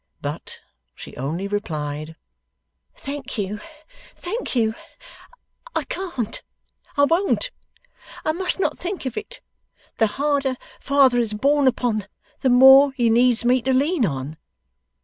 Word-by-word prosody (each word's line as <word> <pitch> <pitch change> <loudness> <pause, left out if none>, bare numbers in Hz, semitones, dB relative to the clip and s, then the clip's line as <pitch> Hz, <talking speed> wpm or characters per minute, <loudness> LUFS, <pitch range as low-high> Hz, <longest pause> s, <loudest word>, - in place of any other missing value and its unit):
But, - - -6 0.3
she - - -11
only 160 +9 -3
replied, 155 -6 -4 0.8
'Thank 275 -2 -6
you, 205 0 -3 0.6
thank 420 - -4
you! 220 -2 +2 1.0
I - - +1
can't. 265 - -4 0.6
I 285 - +5
won't. 370 +10 +1 0.7
I 310 - +3
must 365 +4 -1
not - - -1
think 365 -4 -4
of 260 - -3
it. 435 +4 -6 0.6
The 225 - +4
harder 280 -2 +1 0.2
father 275 -3 +4
is 220 -3 -1
borne 280 +4 +3
upon, 235 -5 0 0.3
the 260 - +1
more 265 +2 +8
he 240 -4 +2
needs 240 0 +3
me 250 +1 +4
to 265 +2 0
lean 285 +3 +2
on. 145 -3 -3
255 Hz, 130 wpm, -22 LUFS, 215-285 Hz, 1.0 s, more